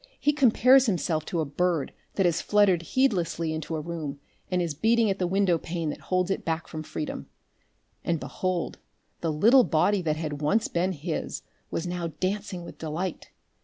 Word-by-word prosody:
He 295 +1 +3
compares 260 -1 +5
himself 165 -5 0
to 170 - -1
a - - -1
bird 165 +1 0 0.2
that 195 - +2
has 170 -1 +2
fluttered 205 -4 +3
heedlessly 170 - 0
into 160 0 -4
a 155 - -2
room 155 -3 -5 0.3
and 180 - +1
is 170 -3 -1
beating 225 +6 +3
at 195 - -3
the 180 - +1
window 185 -2 +2
pane 165 -2 -3
that - - -8
holds 185 0 +1
it - - -1
back 165 0 -2
from 155 - -6
freedom. 155 0 -5 0.8
And 170 -2 0
behold! 185 +1 -3 0.4
the 165 - -1
little 230 - +6
body 200 +3 +2
that 155 -3 0
had 150 -2 -4
once 195 +10 +2
been 180 +2 0
his 160 +1 -4 0.3
was 165 - -3
now 175 -1 -2
dancing 190 -1 -2
with - - -11
delight. 165 +3 -4
175 Hz, 180 wpm, -27 LUFS, 160-195 Hz, 0.8 s, little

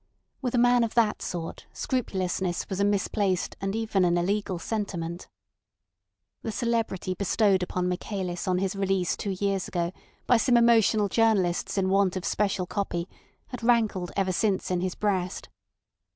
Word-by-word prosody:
With 255 -2 -1
a - - +3
man 245 0 +5
of 230 - -3
that 225 -3 +2
sort 165 -2 -5
scrupulousness 185 -7 -2
was 190 - -3
a - - +3
misplaced 200 -2 0
and 195 +1 -2
even 220 -4 +1
an 175 -1 +3
illegal 190 +1 0
sentiment. 175 -3 -4 1.1
The 225 - -3
celebrity 225 -5 -1
bestowed 200 0 +2
upon 180 0 -1
Michaelis 180 -1 -3
on 180 -1 +2
his 195 +1 -1
release 195 -2 0
two 195 -2 -3
years 195 -2 0
ago 170 -1 -1 0.3
by 245 - +5
some 240 +2 +3
emotional 225 -3 +4
journalists 200 -5 +1
in 190 -1 +2
want 195 -1 +3
of 185 - -4
special 195 -3 0
copy 175 -3 -3 0.4
had 250 - -7
rankled 225 -7 +2
ever 190 -1 +1
since 190 0 0
in 180 -1 0
his 185 0 -2
breast. 190 -3 -2
195 Hz, 155 wpm, -27 LUFS, 180-220 Hz, 1.1 s, man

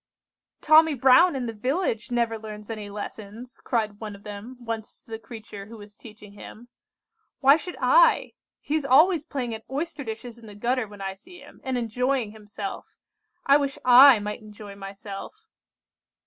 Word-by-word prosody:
"'Tommy 315 -1 +5
Brown 265 +6 +5
in 255 -2 -3
the 230 - -4
village 250 - -2
never 235 -2 0
learns 210 0 -9
any 210 -2 -6
lessons,' 210 +3 -9
cried 215 -3 -2
one 215 -2 -7
of 200 - -16
them 210 +4 -9
once 230 -2 -7
to - - -18
the 225 - -5
creature 220 -3 -10
who 230 +1 -11
was 205 0 -13
teaching 210 -2 -14
him, 230 +3 -12 0.7
'why 275 +1 +6
should 340 +3 -7
I? - - +4 0.3
He 290 - -5
is 310 -1 +1
always 310 +5 +4
playing 255 -6 -4
at 220 0 -7
oyster 295 +2 -4
dishes 230 0 -8
in 225 - -14
the 205 - -11
gutter 240 +2 -1
when 205 -1 -13
I 195 0 -3
see 355 - -16
him, - - -16
and 260 -1 -2
enjoying 245 0 -1
himself. 210 -2 -8 0.5
I 280 +1 +6
wish 280 -2 -3
I 255 +1 +9
might 210 +2 -5
enjoy 210 -1 -11
myself! 200 - -9
230 Hz, 175 wpm, -25 LUFS, 210-270 Hz, 0.7 s, I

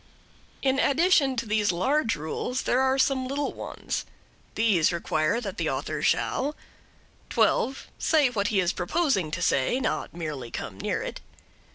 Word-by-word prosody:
In 270 0 +2
addition 285 -2 +3
to 230 -1 -2
these 210 -1 +2
large 255 - +1
rules 160 - -3
there 255 - +2
are 265 0 +2
some 265 -1 +2
little 280 +2 -2
ones. - - -4 0.5
These 205 -8 +3
require 170 +4 0
that 200 -6 -6
the - - 0
author - - -3
shall: 290 +3 +1 0.7
12. 270 +1 +1
Say 300 -5 +3
what 205 -4 0
he 205 -2 +1
is 180 -1 +1
proposing 200 - 0
to 155 - -3
say, 135 - +2
not - - -2
merely 150 -8 -5
come - - -6
near - - -1
it. - - -6
235 Hz, 155 wpm, -26 LUFS, 180-270 Hz, 0.7 s, addition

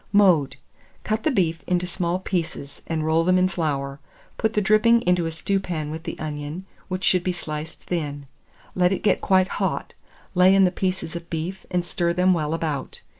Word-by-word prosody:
Mode. 185 -9 +4 0.5
Cut 215 +1 -1
the 310 - +1
beef 170 - +1
into 180 0 +1
small 175 0 -1
pieces, 170 -6 -4
and 160 -2 -1
roll 160 +1 +3
them 185 +2 +3
in 185 0 +4
flour; 145 -6 -2 0.4
put 220 -1 0
the 210 - +2
dripping 215 +3 +4
into 175 -2 +2
a - - -3
stewpan 160 -2 -2
with 160 +1 -7
the - - -5
onion, 150 +3 -5 0.2
which 185 0 -4
should 180 -2 +3
be 185 - 0
sliced 155 -2 -6
thin. 145 -5 -3 0.5
Let 180 0 +3
it 190 - -2
get 210 - +3
quite 185 -1 +3
hot; - - -1 0.4
lay 185 +1 +6
in 195 - +6
the 180 - +2
pieces 185 -3 -2
of 170 0 -7
beef, 170 +4 -4
and 180 -1 0
stir 170 0 0
them 180 +1 +4
well 155 -2 0
about. 155 -5 -3
175 Hz, 190 wpm, -24 LUFS, 160-185 Hz, 0.5 s, lay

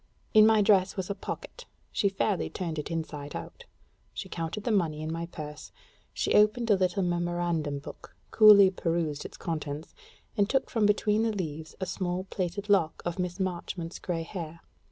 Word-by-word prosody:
In 215 0 +8
my 220 -2 +5
dress 195 -2 +3
was 190 +1 -2
a - - 0
pocket; 480 - -7 0.3
she 200 - +2
fairly 195 0 0
turned 165 -4 -4
it 150 - -5
inside 155 -3 -5
out; - - -8 0.5
she - - -5
counted 165 +5 -4
the 235 - 0
money 160 -7 +1
in 155 - -3
my 165 0 -4
purse; 150 -3 -8 0.4
she - - -1
opened 215 +2 +4
a - - +7
little 185 0 +1
memorandum 175 -4 -1
book, 140 - -11 0.2
coolly 205 -3 +8
perused 165 -5 -2
its - - -9
contents, 155 -1 -4 0.4
and 200 0 +2
took 270 - 0
from 220 -3 +3
between 210 +1 +2
the 225 0 +1
leaves 160 -6 -5
a 190 - -2
small 185 -1 -2
plaited 190 +2 -3
lock 190 -6 +2
of 175 +1 -3
Miss 180 +1 -2
Marchmont's 175 -2 -3
gray 165 -2 -2
hair. 165 -2 -7
180 Hz, 175 wpm, -28 LUFS, 165-200 Hz, 0.5 s, In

